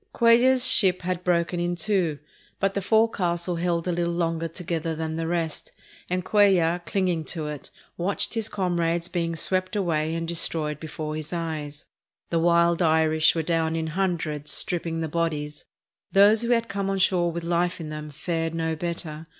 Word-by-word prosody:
Cuellar's 245 +2 +4
ship 185 -7 +4
had 180 0 -2
broken 175 -1 +1
in 175 0 -1
two, 175 -4 0 0.4
but 195 0 +1
the 200 - -1
forecastle 180 -5 +1
held 170 0 -1
a - - +1
little 170 0 -1
longer 165 -1 -1
together 165 -1 -3
than 160 0 -3
the 165 0 -2
rest, 165 -2 -2 0.4
and 180 0 -1
Cuellar, 185 -5 +3
clinging 180 -5 0
to 160 0 -4
it, 150 -2 -7 0.3
watched 185 +3 -1
his 225 -2 -1
comrades 170 -2 -1
being 170 -2 -2
swept 185 +4 0
away 165 -5 0
and 165 0 -3
destroyed 160 -3 0
before 155 -1 -5
his 155 0 -6
eyes. 155 -4 -4 0.5
The 165 - +2
wild 170 +1 +3
Irish 160 -1 +3
were 165 - 0
down 165 0 0
in 160 -1 -2
hundreds 165 -6 -2
stripping 165 -2 -1
the 160 - -1
bodies. 150 -2 -3 0.5
Those 205 +3 +6
who 235 - -2
had 230 -1 +2
come 200 -2 -3
on 195 - 0
shore 180 -2 +2
with 170 0 -5
life 175 +1 0
in 160 -2 -6
them 150 0 -6
fared 165 +2 -3
no 160 -1 -1
better. 160 -1 -5
170 Hz, 175 wpm, -25 LUFS, 160-180 Hz, 0.5 s, Those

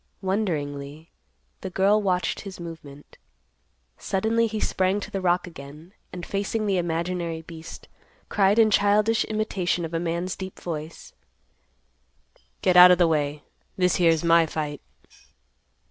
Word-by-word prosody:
Wonderingly, 155 -6 -3 0.5
the 190 - -6
girl 195 +3 +2
watched 185 -3 -1
his 195 -3 -9
movement. 155 -4 -11 0.8
Suddenly 225 +4 0
he 215 0 -4
sprang 190 +1 0
to - - -8
the 195 - -3
rock 180 -1 +1
again, 155 +1 -12 0.2
and 175 -1 -7
facing 205 +2 -2
the 195 -3 +1
imaginary 170 -1 -3
beast, 165 0 -11 0.4
cried 200 +1 +2
in 220 -1 +5
childish 210 +3 +3
imitation 195 -5 -1
of 165 - -8
a 165 - 0
man's 170 +2 -2
deep 190 -1 -8
voice, 160 -1 -7 1.5
"Get 185 - +3
out 180 0 +10
of 180 - +5
the 175 -1 +4
way. 150 -2 -1 0.3
This 180 -1 +2
here's 165 -2 +3
my 165 -1 +4
fight." 150 -2 -4
180 Hz, 135 wpm, -25 LUFS, 165-195 Hz, 1.5 s, out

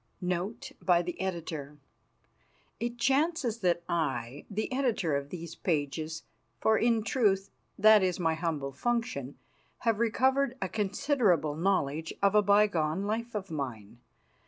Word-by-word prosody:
NOTE 180 +4 -3
BY 175 -1 +4
THE 175 0 -5
EDITOR 160 -6 -4 1.0
It 240 +2 -3
chances 275 -2 +1
that 175 -4 +1
I, 135 -5 -2
the 215 +3 -3
Editor 235 - +1
of 140 0 -3
these 170 0 -7
pages 155 0 -2 0.4
for, 220 - +3
in 230 -2 +2
truth, 200 -5 +1 0.3
that 215 0 +7
is 185 -1 0
my 165 -2 +2
humble 160 -4 -2
function 230 - -2 0.5
have 225 -2 +2
recovered 260 +3 +2
a 190 - -2
considerable 205 - +1
knowledge 160 -3 0
of 200 0 +3
a 210 - +6
bygone 200 -5 +2
life 225 +3 -3
of 195 -4 -4
mine. 120 -7 -5
190 Hz, 135 wpm, -30 LUFS, 160-225 Hz, 1.0 s, that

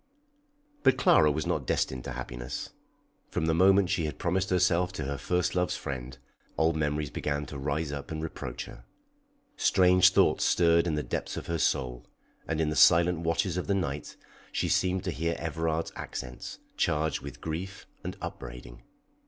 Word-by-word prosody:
But 130 -1 +4
Clara 80 - +5
was 75 0 -1
not - - -1
destined 65 -1 -1
to 70 - -4
happiness. - - -6 0.6
From - - -1
the 80 - +2
moment 95 +2 +5
she 85 - +1
had 75 - -4
promised 95 +2 0
herself 90 0 +2
to - - -4
her 70 0 -3
first 90 -1 0
love's 90 -1 0
friend, 65 -1 -6 0.4
old 80 0 +3
memories 75 -1 -1
began 75 0 -2
to 70 0 -7
rise 75 +2 -2
up 70 -1 -6
and 80 - -4
reproach 80 - -5
her. - - -12 0.7
Strange 90 -1 +5
thoughts 90 - +3
stirred 85 0 +4
in 80 - 0
the 75 - -1
depths - - -4
of - - -5
her 85 -1 -2
soul, 60 -4 0 0.4
and 80 -1 -1
in 80 -1 +1
the - - -2
silent 85 0 +6
watches 85 +3 0
of 90 - -3
the 100 - +2
night 75 -6 -3 0.4
she - - 0
seemed 95 0 +1
to 95 - -2
hear 85 +1 -1
Everard's 80 0 -2
accents, 60 -1 -6 0.2
charged 75 +1 +1
with 70 -1 -8
grief 85 +4 -5 0.2
and - - -5
upbraiding. - - -8
80 Hz, 175 wpm, -29 LUFS, 70-90 Hz, 0.7 s, silent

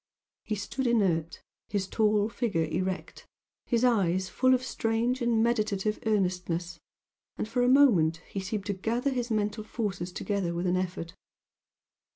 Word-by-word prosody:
He 215 - -2
stood 245 +6 -3
inert 175 -8 +1 0.2
his 195 -2 -2
tall 210 -1 +2
figure 210 -8 -1
erect 185 +4 -4 0.4
his 235 -1 +1
eyes 190 -6 +2
full 255 0 +3
of 255 - -2
strange 235 +1 0
and 235 -2 +2
meditative 215 -3 0
earnestness, 180 -4 -1 0.6
and - - -2
for 245 +2 0
a 245 - +4
moment 210 - +5
he 195 - -5
seemed 195 +1 -3
to 205 - -1
gather 235 +8 -1
his 245 -2 -2
mental 215 0 -1
forces 200 -5 -3
together 185 -2 -2
with 175 +2 -2
an 180 0 +2
effort. 180 -2 -3
210 Hz, 150 wpm, -28 LUFS, 185-235 Hz, 0.6 s, moment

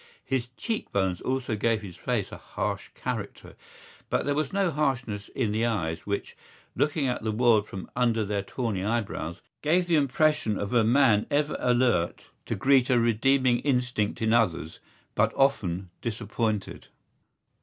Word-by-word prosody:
His 130 -3 -1
cheekbones 95 - -1
also 130 -3 -1
gave 110 +1 0
his 90 -4 -8
face - - -2
a - - -7
harsh - - -4
character; - - -5 0.5
but - - 0
there 145 - +1
was 150 -1 -1
no 195 -3 +1
harshness 125 -9 -1
in 115 -5 0
the 110 +2 0
eyes 85 -7 -2
which, 100 0 -3 0.4
looking 150 0 +1
at 125 -1 -1
the 110 0 -1
world 110 -2 +3
from 95 - -7
under 115 -3 +2
their 100 0 -1
tawny 105 -2 -3
eyebrows, 100 -6 -2 0.2
gave 175 +4 +2
the 170 -2 +3
impression 145 -5 +2
of 100 +2 -3
a 120 -2 +5
man 110 -3 +4
ever 150 +1 +1
alert 120 -8 +2 0.2
to - - -1
greet 135 -2 +3
a 125 - +4
redeeming 120 +2 +3
instinct 125 -6 0
in 110 0 +3
others 85 -9 +1 0.3
but - - +2
often 95 -10 +1
disappointed. 110 -2 -3
120 Hz, 155 wpm, -27 LUFS, 105-135 Hz, 0.5 s, a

